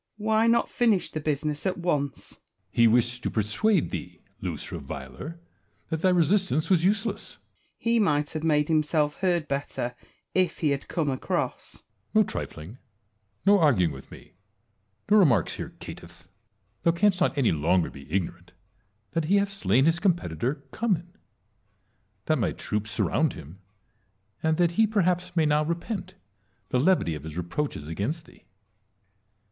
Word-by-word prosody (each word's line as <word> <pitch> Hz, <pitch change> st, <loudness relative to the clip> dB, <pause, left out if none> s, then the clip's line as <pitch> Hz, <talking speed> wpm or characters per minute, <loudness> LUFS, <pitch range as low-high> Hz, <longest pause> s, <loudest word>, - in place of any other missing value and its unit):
Why 220 Hz, +1 st, +2 dB
not 235 Hz, 0 st, +3 dB
finish 225 Hz, -6 st, +1 dB
the 155 Hz, -, -3 dB
business 150 Hz, 0 st, -2 dB
at 185 Hz, -, -1 dB
once? 145 Hz, -6 st, -2 dB
Edvjard. -, -, -46 dB, 0.3 s
He 115 Hz, 0 st, +5 dB
wished 120 Hz, +1 st, +2 dB
to -, -, -1 dB
persuade 140 Hz, -, +1 dB
thee, -, -, -7 dB, 0.2 s
loose -, -, -4 dB
reviler, 155 Hz, -, -7 dB, 0.5 s
that 160 Hz, -1 st, -1 dB
thy 185 Hz, -, +4 dB
resistance 180 Hz, -2 st, +2 dB
was 175 Hz, -3 st, +4 dB
useless. 205 Hz, +4 st, 0 dB
Wallace. -, -, -41 dB
He 230 Hz, 0 st, +1 dB
might 150 Hz, -8 st, +1 dB
have 155 Hz, -1 st, -4 dB
made 150 Hz, -2 st, +2 dB
himself 155 Hz, -1 st, +1 dB
heard 175 Hz, -4 st, +1 dB
better 140 Hz, -3 st, -3 dB, 0.4 s
if 185 Hz, -3 st, +1 dB
he 155 Hz, -, +1 dB
had 140 Hz, 0 st, -2 dB
come 165 Hz, -4 st, -1 dB
across. 130 Hz, -, -3 dB
Edtvard. -, -, -42 dB, 0.3 s
No -, -, +7 dB
trifling; 85 Hz, +11 st, -6 dB, 0.7 s
no 200 Hz, 0 st, +6 dB
arguing 100 Hz, -, +3 dB
with 65 Hz, 0 st, -11 dB
me; -, -, -14 dB, 0.8 s
no 215 Hz, -, +7 dB
remarks 125 Hz, -, +3 dB
here, -, -, -6 dB
caitiflf! 85 Hz, -1 st, -10 dB, 0.6 s
Thou 170 Hz, -, +3 dB
canst 190 Hz, +1 st, +2 dB
not 175 Hz, -, +2 dB
any 135 Hz, -5 st, +3 dB
longer 85 Hz, +3 st, +1 dB
be 70 Hz, 0 st, -13 dB
ignorant 90 Hz, -1 st, -3 dB, 0.6 s
that 165 Hz, -2 st, -1 dB
he 190 Hz, +6 st, +3 dB
hath 200 Hz, 0 st, +2 dB
slain 130 Hz, -, +2 dB
his 165 Hz, +1 st, +3 dB
competitor, 150 Hz, -, 0 dB
Cummin; 180 Hz, -6 st, -1 dB, 1.1 s
that 155 Hz, -, +1 dB
my -, -, 0 dB
troops 105 Hz, 0 st, -3 dB
surround 105 Hz, -, +1 dB
hira; 75 Hz, -, -10 dB, 0.9 s
and 160 Hz, 0 st, +1 dB
that 175 Hz, -1 st, +3 dB
he 220 Hz, +5 st, +3 dB
perhaps 180 Hz, -3 st, 0 dB
may 160 Hz, -2 st, +3 dB
now 150 Hz, 0 st, +3 dB
repent 180 Hz, +3 st, -4 dB, 0.5 s
the 125 Hz, -, +1 dB
levity 150 Hz, -, +3 dB
of 75 Hz, -, -6 dB
his 80 Hz, +2 st, -8 dB
reproaches 90 Hz, -, -3 dB
against 115 Hz, -, -3 dB
thee. -, -, -20 dB
155 Hz, 155 wpm, -26 LUFS, 120-185 Hz, 1.1 s, No